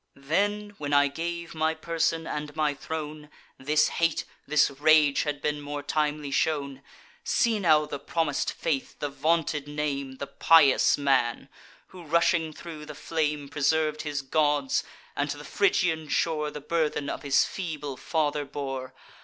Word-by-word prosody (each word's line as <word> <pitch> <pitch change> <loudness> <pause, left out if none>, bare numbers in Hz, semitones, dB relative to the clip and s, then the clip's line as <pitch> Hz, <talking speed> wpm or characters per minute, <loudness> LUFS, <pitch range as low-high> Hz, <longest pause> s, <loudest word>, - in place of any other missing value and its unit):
Then, 205 +9 -1
when 145 -1 -3
I 145 0 +5
gave 170 +3 -5
my 160 0 0
person 165 0 -1
and 150 -1 -5
my 155 -2 +1
throne, 150 +1 -6 0.3
This 150 +3 +3
hate, 165 -1 0 0.2
this 150 -1 +3
rage, 150 0 +4
had 145 -1 -3
been 150 0 -1
more 145 0 -5
timely 150 -2 -1
shown. 140 -2 0 0.4
See 230 -3 +2
now 155 -5 +4
the 145 -1 -6
promis'd 150 0 -1
faith, 140 -5 -3
the 145 - -3
vaunted 155 0 0
name, 145 -2 -3
The 140 - -5
pious 155 -2 +5
man, 135 -2 +1 0.4
who, 185 - -12
rushing 165 0 +2
thro' 155 0 -9
the 150 - -9
flame, 150 -3 -2
Preserv'd 155 +1 +1
his 145 -2 -3
gods, 150 - +1 0.3
and - - -1
to - - -3
the - - -10
Phrygian 170 - +1
shore 155 -2 0
The 150 0 -8
burthen 150 -2 -1
of - - -4
his 140 -1 +3
feeble 150 -7 -5
father 150 0 -1
bore! 135 -2 -5
150 Hz, 155 wpm, -27 LUFS, 145-160 Hz, 0.4 s, I